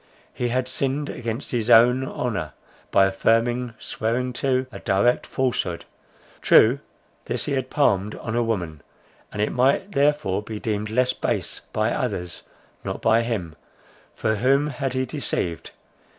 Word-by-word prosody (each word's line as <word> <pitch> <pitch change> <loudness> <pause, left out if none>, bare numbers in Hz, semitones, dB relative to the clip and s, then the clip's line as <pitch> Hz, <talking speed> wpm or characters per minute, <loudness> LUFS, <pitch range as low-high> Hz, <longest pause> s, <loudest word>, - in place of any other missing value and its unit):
He 125 - -2
had 125 +1 0
sinned 135 +3 -2
against 115 +2 -5
his 120 -1 -1
own 125 +3 +6
honour, 105 - -3 0.4
by 95 - +5
affirming, 115 +5 +1
swearing 125 +3 -2
to, 130 +1 0
a 100 - -8
direct 100 +7 +1
falsehood; 90 -10 -1 0.6
true 120 +5 +6 0.5
this - - -1
he - - -3
had 130 -1 -1
palmed 105 -8 +1
on 110 - -5
a 120 - +2
woman, 90 -10 -2 0.5
and 105 - -1
it - - -1
might 135 +10 +2
therefore 145 - +1
be 105 0 -7
deemed 105 -1 -2
less 125 +3 +2
base—by - - -2
others—not 90 -1 -5
by 115 +1 +3
him;—for 110 +1 -5
whom 135 +6 +2
had 135 -2 -3
he 130 0 0
deceived? 120 - -3
120 Hz, 135 wpm, -23 LUFS, 105-130 Hz, 0.6 s, own